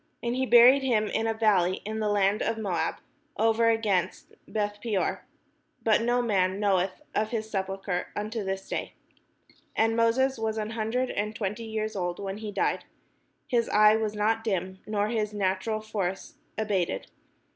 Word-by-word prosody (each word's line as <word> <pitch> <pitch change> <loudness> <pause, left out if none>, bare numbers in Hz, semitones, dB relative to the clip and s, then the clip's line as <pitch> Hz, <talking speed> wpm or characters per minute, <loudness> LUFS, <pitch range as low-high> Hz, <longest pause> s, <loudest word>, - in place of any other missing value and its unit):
And 240 +1 -1
he 260 0 0
buried 245 +3 +8
him 235 -5 +2
in 225 - 0
a 225 - +1
valley 195 -5 +3
in 220 +1 -3
the 215 -1 0
land 205 0 +2
of 225 - 0
Moab, 200 -6 -1 0.4
over 225 +1 +3
against 205 -5 0
Beth 205 -1 -2
peor: 210 -5 -1 0.6
but 225 0 +4
no 245 +1 +1
man 190 -4 +1
knoweth 195 +3 +1
of 215 0 0
his 220 -2 -4
sepulchre 190 -2 -2
unto 215 +1 -3
this 190 0 -4
day. - - -4 0.8
And 225 0 +2
Moses 240 +3 +2
was 220 0 -1
an 215 0 -3
hundred 230 +3 -1
and 210 +1 -2
twenty 210 +2 -3
years 220 0 -3
old 175 -2 -2
when 195 +1 -5
he 215 -1 -5
died: 195 - 0 0.6
his 240 -5 +1
eye 210 +1 +6
was 215 -1 -1
not 220 +2 +1
dim, 190 -3 -2
nor 210 0 0
his 215 -2 -1
natural 200 +2 -1
force 205 - -3 0.2
abated. 195 - -1
215 Hz, 165 wpm, -27 LUFS, 195-225 Hz, 0.8 s, buried